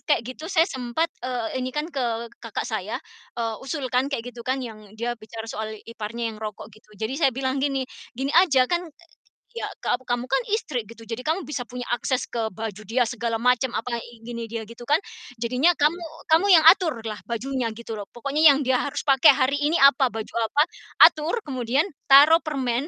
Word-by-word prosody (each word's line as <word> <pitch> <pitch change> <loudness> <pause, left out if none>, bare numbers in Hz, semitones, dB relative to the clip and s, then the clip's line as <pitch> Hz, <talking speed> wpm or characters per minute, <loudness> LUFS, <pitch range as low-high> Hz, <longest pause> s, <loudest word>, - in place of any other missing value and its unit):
kayak 290 -7 +1
gitu, 255 +7 -7
saya 330 -4 +4
sempat, 260 +2 -2
eee, 250 0 -3
ini 255 - -2
kan 300 - 0
ke 235 -3 -2
kakak - - -4
saya, - - -3 0.4
eee, 230 -1 -2
usulkan 265 -2 -1
kayak 245 -3 -4
gitu 240 - -10
kan 260 +2 -2
yang 215 -2 -11
dia 235 +2 -2
bicara 225 -1 -9
soal 220 -1 -5
iparnya 230 0 -5
yang 215 - -12
rokok 215 0 -7
gitu. 215 +1 -20
Jadi 220 +5 -3
saya 275 - +4
bilang 265 0 -1
gini, 270 -1 0 0.3
"Gini 270 +3 -2
aja 310 -7 +5
kan, 345 +7 0
e 340 +3 -22 0.4
ya 475 -1 -5 0.2
ka 245 - +1
kamu 245 -1 -3
kan - - +3 0.2
istri 255 - -3
gitu, 230 +2 -13
jadi 230 +4 -6
kamu 335 +4 0
bisa 280 -6 -5
punya 245 +1 -7
akses 250 +2 0
ke 240 - -4 0.2
baju 215 0 -5
dia 240 +5 +2
segala 235 -1 -2
macam, 250 +2 +1
apa, 235 +1 -2 0.2
gini 235 0 -6
dia 225 0 -5
gitu 230 +2 -11
kan, 290 - +3 0.5
jadinya 255 +9 +3
kamu 305 +3 +2 0.3
kamu 325 +5 +5
yang 320 - +7
aturlah 230 - 0
bajunya 250 +2 -2
gitu 225 -1 -7
loh. 200 - -6
Pokoknya 280 +6 +1
yang 285 -1 +7
dia 260 -1 +2
harus 285 +2 -3
pakai 275 0 +6
hari 275 +1 +1
ini 295 +2 +1
apa? 275 -1 +6
Baju 225 -3 -5 0.2
apa, 290 +7 +3 0.4
atur 310 +5 +6
kemudian 260 - 0 0.2
taruh 290 +4 +8
permen 270 -5 -2
250 Hz, 195 wpm, -24 LUFS, 230-285 Hz, 0.5 s, taruh